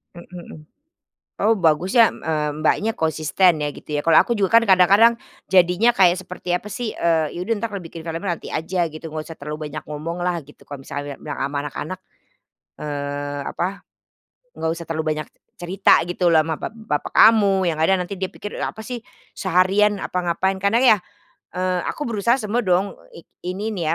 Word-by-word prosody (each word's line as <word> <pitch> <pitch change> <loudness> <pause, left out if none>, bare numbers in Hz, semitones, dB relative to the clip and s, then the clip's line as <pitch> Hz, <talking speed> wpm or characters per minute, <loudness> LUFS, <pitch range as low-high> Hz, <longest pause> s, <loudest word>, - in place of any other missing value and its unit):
Mhm 170 - -11
mhm. 175 -3 -10 0.8
Oh 220 +1 +3
bagus 170 +3 +1
ya 230 -2 +6
mmm, - - -13
eee, 150 -2 -1
Mbaknya 210 +8 +1
konsisten 160 0 +1
ya 145 - -1
gitu 150 - -6
ya, 145 - -1
kalau 165 -1 +6
aku 235 - 0
juga 205 +3 +4
kan - - -5
kadang-kadang 200 +5 +6 0.3
jadinya 180 +4 +4
kayak 180 -1 +4
seperti 180 -1 -6
apa 180 +4 -2
sih, 220 +2 -4
eee, 165 -2 +1
ya - - -7
udah 225 +6 0
entar, 225 +2 -3
eee, 200 - -4
bikin 165 -1 -10
filmnya 165 0 -4 0.2
nanti - - -10
aja 175 +3 -1
gitu, 155 +1 -8
nggak 155 0 -5
usah 165 - -11
terlalu 150 +1 -6
banyak - - -4
ngomong 160 +4 -5
lah 175 0 0
gitu, 150 - -19
kalau 140 -2 -8
misalnya 145 0 -6
bilang 145 - -7
ama 140 +1 -2
anak-anak, 155 +4 -5 0.8
eee, 145 -1 -4
apa, 190 +3 -3 0.7
nggak 160 - -2
usah 170 +1 -5
terlalu 160 -1 -3
banyak 155 - -5
c - - -39 0.2
cerita 190 +3 +4
gitu 175 0 +1
loh 160 -1 +5
ama 160 - -1
bap - - -5
bapak 215 -11 -3
kamu, 200 -4 +5
yang 165 -2 -1
kadang 190 +3 +3
nanti 200 - -6
dia 190 -1 -4
pikir 205 - -8
apa - - -4
sih, 245 -3 -5 0.3
seharian 195 +3 +2
apa 180 -1 -3
ngapain, 190 +2 -1
karena 200 +3 +3 0.2
ya, - - -2 0.6
eee, 180 -1 -1
aku - - -4
berusaha 235 -2 +1
semua 235 -2 -2
dong 185 +2 +1 0.2
eee 170 - -11 0.2
i 180 - -2
ini 210 +3 -3
nih 165 -6 -1
180 Hz, 200 wpm, -21 LUFS, 155-200 Hz, 0.8 s, ya